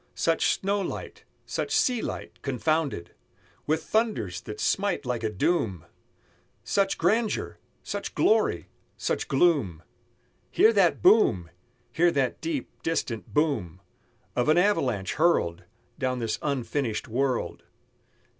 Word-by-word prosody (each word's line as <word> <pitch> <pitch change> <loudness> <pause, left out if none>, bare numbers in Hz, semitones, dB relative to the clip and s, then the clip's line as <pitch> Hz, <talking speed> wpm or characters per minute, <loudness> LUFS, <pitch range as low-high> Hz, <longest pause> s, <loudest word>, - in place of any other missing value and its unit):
Such 165 -1 +1
snow 200 +1 0
light, 190 - -6 0.2
such - - -3
sea 250 -3 +2
light, - - -6
confounded 140 - -1 0.5
With 155 +1 +1
thunders 160 - -1
that 105 - -8
smite 200 -6 0
like 125 -2 -2
a 110 - +1
doom! 105 - 0 0.8
Such 195 -1 +1
grandeur! 220 0 0 0.2
such - - -5
glory! 215 - +2 0.3
such - - -2
gloom! 135 - +2 0.7
Hear 225 - +5
that 190 -5 +3
boom! 135 - +4 0.4
Hear 175 +2 +3
that 135 -3 0
deep 315 -4 -3
distant 115 - -2
boom 145 - 0 0.6
Of 125 +4 +1
an 155 - +5
avalanche 140 - +1
hurled 90 - +1 0.3
Down 130 -1 0
this 115 -3 -2
unfinished 135 -4 -2
world! 125 +2 -1
145 Hz, 115 wpm, -27 LUFS, 110-185 Hz, 0.8 s, Hear